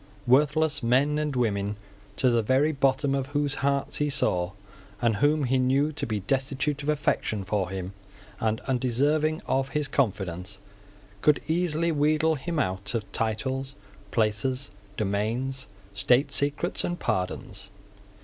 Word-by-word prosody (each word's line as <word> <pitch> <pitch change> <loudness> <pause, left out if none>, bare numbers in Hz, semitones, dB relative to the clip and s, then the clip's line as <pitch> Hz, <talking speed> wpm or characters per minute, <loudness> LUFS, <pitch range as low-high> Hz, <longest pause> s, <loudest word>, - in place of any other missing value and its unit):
Worthless 145 +3 +3
men 135 +5 +2
and 150 -2 -1
women, 105 -4 0 0.4
to 130 -2 +3
the 120 -1 +3
very 130 +7 +3
bottom 135 0 +1
of 135 -1 -1
whose 145 0 0
hearts 140 0 0
he 150 0 +1
saw, 90 -10 +1 0.5
and 115 -3 +2
whom 145 +5 +3
he 130 0 +2
knew 135 +4 +2
to 155 - -4
be 105 -3 -2
destitute 135 +6 -1
of 145 - -3
affection 140 -8 0
for 95 -1 -1
him 95 0 -5 0.5
and 110 0 0
undeserving 140 +5 +1
of 135 0 0
his 150 0 0
confidence, 95 -5 -1 0.6
could 150 -1 +4
easily 170 0 +1
wheedle 155 +1 +2
him 165 +3 -3
out 95 -4 -1
of 110 -4 -3
titles, 130 +5 -2 0.3
places, 115 +4 0 0.3
domains, 115 +6 -1 0.3
state 125 +8 +3
secrets 145 +5 -1
and 175 0 -2
pardons. 90 0 -3
135 Hz, 140 wpm, -27 LUFS, 110-145 Hz, 0.6 s, could